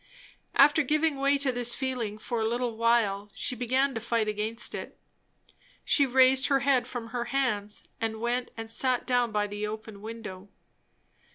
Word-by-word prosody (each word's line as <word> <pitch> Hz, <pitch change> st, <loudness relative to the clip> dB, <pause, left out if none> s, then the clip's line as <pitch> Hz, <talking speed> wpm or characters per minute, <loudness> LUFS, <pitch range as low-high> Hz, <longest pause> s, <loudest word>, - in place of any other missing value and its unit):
After 295 Hz, +3 st, +6 dB
giving 300 Hz, 0 st, +1 dB
way 280 Hz, +1 st, +3 dB
to 275 Hz, -1 st, +1 dB
this 245 Hz, -1 st, +2 dB
feeling 245 Hz, -6 st, -3 dB
for 225 Hz, +1 st, -3 dB
a 220 Hz, -, +1 dB
little 240 Hz, 0 st, -2 dB
while, 220 Hz, -3 st, +1 dB
she 255 Hz, -, -1 dB
began 260 Hz, +3 st, +1 dB
to 225 Hz, -, -3 dB
fight 230 Hz, -1 st, 0 dB
against 215 Hz, +2 st, -3 dB
it. -, -, -7 dB, 0.9 s
She 280 Hz, -2 st, +4 dB
raised 260 Hz, +1 st, +5 dB
her 275 Hz, -1 st, +2 dB
head 270 Hz, -2 st, +2 dB
from 235 Hz, -2 st, -6 dB
her 240 Hz, 0 st, -3 dB
hands, 210 Hz, -7 st, -1 dB, 0.2 s
and 220 Hz, -1 st, -2 dB
went 240 Hz, +2 st, -1 dB
and 225 Hz, 0 st, -6 dB
sat 255 Hz, +1 st, +1 dB
down 245 Hz, -2 st, +1 dB
by 210 Hz, -1 st, +1 dB
the 205 Hz, +1 st, -4 dB
open 215 Hz, -1 st, -8 dB
window. 210 Hz, -3 st, -8 dB
235 Hz, 170 wpm, -28 LUFS, 220-260 Hz, 0.9 s, After